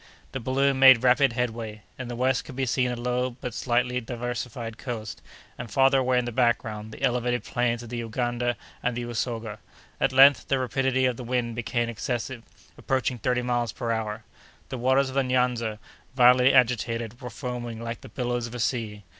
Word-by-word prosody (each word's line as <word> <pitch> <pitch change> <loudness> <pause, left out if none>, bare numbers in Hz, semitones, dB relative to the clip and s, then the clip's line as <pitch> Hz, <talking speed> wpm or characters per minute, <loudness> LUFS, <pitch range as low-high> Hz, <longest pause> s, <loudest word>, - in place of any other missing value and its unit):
The 135 - -4
balloon 135 +2 +1
made 130 -3 +8
rapid 130 0 +4
headway. 115 -3 -3 0.2
In 130 - -5
the 120 - -5
west 125 0 +1
could 135 - -10
be 135 0 0
seen 125 0 +1
a 125 - -2
low 125 +1 -1
and 125 0 -11
but 125 -4 -5
slightly 125 +1 0
diversified 120 -1 -5
coast, 115 -5 -6 0.4
and, 120 -1 -6
farther 135 +4 +4
away 130 -1 +2
in 125 - +1
the 120 - -3
background, 110 -3 0
the 125 - -10
elevated 125 -1 +1
plains 120 -1 -1
of 120 - -10
the 120 0 -4
Uganda 120 +1 -2 0.2
and 125 -1 -1
the 120 - -3
Usoga. 115 -2 -4 0.4
At - - +2
length, 135 0 +6
the 135 - +2
rapidity 130 0 +1
of 125 -2 0
the 125 - -6
wind 120 -1 -1
became 120 0 -1
excessive, 120 +1 -4 0.4
approaching 130 -2 -1
thirty 125 +2 0
miles 120 -2 0
per 115 - -3
hour. 110 -2 -3 0.5
The 130 - -5
waters 130 +2 +3
of - - -8
the 135 0 +2
Nyanza, 125 -4 0 0.4
violently 125 +1 +6
agitated, 120 -2 +1
were 125 - -6
foaming 120 0 -5
like 115 0 -5
the - - -11
billows 120 -2 -2
of 115 - -9
a - - -5
sea. 110 -3 -2
120 Hz, 195 wpm, -26 LUFS, 115-130 Hz, 0.5 s, made